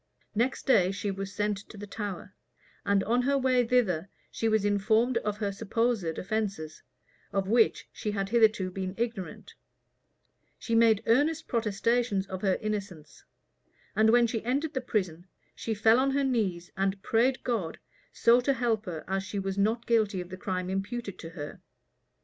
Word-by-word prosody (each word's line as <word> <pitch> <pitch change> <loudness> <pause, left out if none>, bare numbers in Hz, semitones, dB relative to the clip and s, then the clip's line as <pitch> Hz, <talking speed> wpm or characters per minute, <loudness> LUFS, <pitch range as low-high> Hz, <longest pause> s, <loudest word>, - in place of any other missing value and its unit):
Next 240 +5 0
day, 190 -9 +4
she 200 +1 -2
was 195 0 -5
sent 210 0 -1
to 215 - -11
the 205 - -7
Tower; 205 -1 -6 0.5
and 200 -1 +2
on 240 +4 +2
her 275 +2 +2
way 255 -2 +3
thither, 195 -8 +1 0.2
she 225 - 0
was 220 -2 +2
informed 220 +4 +2
of 210 -2 -3
her 205 -2 -1
supposed 220 -4 -1
offences, 195 -6 -3 0.5
of 195 -1 -1
which 225 +2 +3
she 215 - -4
had 195 -2 -2
hitherto 215 -5 +3
been 185 0 -4
ignorant: 225 -5 -4 1.0
she 230 - -4
made 225 -2 +4
earnest 300 +7 +2
protestations 230 -2 0
of 190 -1 -6
her 190 -2 +2
innocence; 200 -7 -5 0.7
and 220 +1 +4
when 240 +1 +5
she 225 -1 -2
entered 280 +6 -1
the 260 - -1
prison, 185 -7 -2 0.3
she 225 - -3
fell 225 +3 +5
on 270 +1 +2
her 280 +1 +1
knees, 200 -10 -1
and 195 0 -1
prayed 250 +3 +2
God 215 -10 -2 0.3
so 235 +1 +4
to 275 +2 +2
help 230 -4 -1
her, 165 -3 -5
as 195 0 0
she 195 +2 -6
was 195 -1 -2
not 220 +4 +1
guilty 215 -5 +2
of 180 0 -6
the 185 - -6
crime 185 -3 -3
imputed 200 +1 -4
to 165 - -7
her. 150 -3 -8
210 Hz, 170 wpm, -28 LUFS, 195-235 Hz, 1.0 s, when